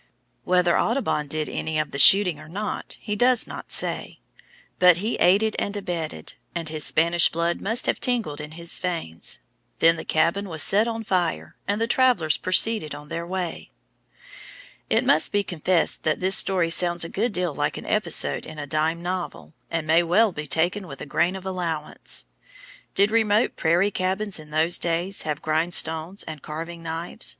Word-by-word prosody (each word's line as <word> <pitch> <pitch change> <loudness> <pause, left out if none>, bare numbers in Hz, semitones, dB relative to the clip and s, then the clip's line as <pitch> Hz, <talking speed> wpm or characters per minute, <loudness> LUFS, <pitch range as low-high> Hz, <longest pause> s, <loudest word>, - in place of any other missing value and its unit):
Whether 180 -1 +3
Audubon 230 - 0
did 155 +1 0
any 160 -1 -3
of 155 0 -1
the 140 - -2
shooting 180 +1 +6
or - - -12
not, 205 +5 -5
he 210 -1 -4
does 245 +2 +3
not - - -9
say. - - 0 0.6
But 180 -2 +6
he 215 +6 -2
aided 205 +4 +3
and 200 +1 -2
abetted, 175 -5 -5 0.2
and 165 -2 -3
his 155 -1 -1
Spanish 170 +2 +3
blood 170 +1 -1
must 225 +5 0
have - - 0
tingled 225 - -1
in 150 +1 -9
his 170 +1 -2
veins. 165 - -4 0.4
Then 165 0 +5
the - - -6
cabin 175 +5 0
was 160 -2 +2
set 210 +3 +5
on 225 -1 -3
fire, 180 -5 -1
and 205 +1 0
the 230 - +1
travellers 235 -11 +3
proceeded 185 -2 +1
on 150 0 -11
their 170 +1 -4
way. 180 -2 -4 1.2
It - - +2
must - - +3
be 205 0 +1
confessed 175 -1 0
that 155 - 0
this 185 +1 +2
story 180 -4 +2
sounds 175 0 +2
a - - -3
good 220 +7 -1
deal 180 -4 -1
like 145 0 -2
an - - -8
episode 210 -7 0
in 155 - -10
a 145 - -5
dime 160 +3 -1
novel, 175 - -5 0.2
and 165 -2 -2
may 160 +2 +4
well 195 +6 +3
be 150 -3 -6
taken 180 +6 -1
with 140 -4 -9
a - - -5
grain 175 +6 0
of 190 0 -8
allowance. 170 -5 -4 0.7
Did 200 +2 +3
remote 220 -1 +2
prairie 175 +5 +2
cabins 190 +1 -2
in 155 -1 -12
those 160 +3 +2
days 175 +3 -1
have 150 0 -3
grindstones 160 +2 -1
and 155 -3 -8
carving 165 +2 -7
knives? 165 +6 -4
175 Hz, 180 wpm, -24 LUFS, 160-200 Hz, 1.2 s, shooting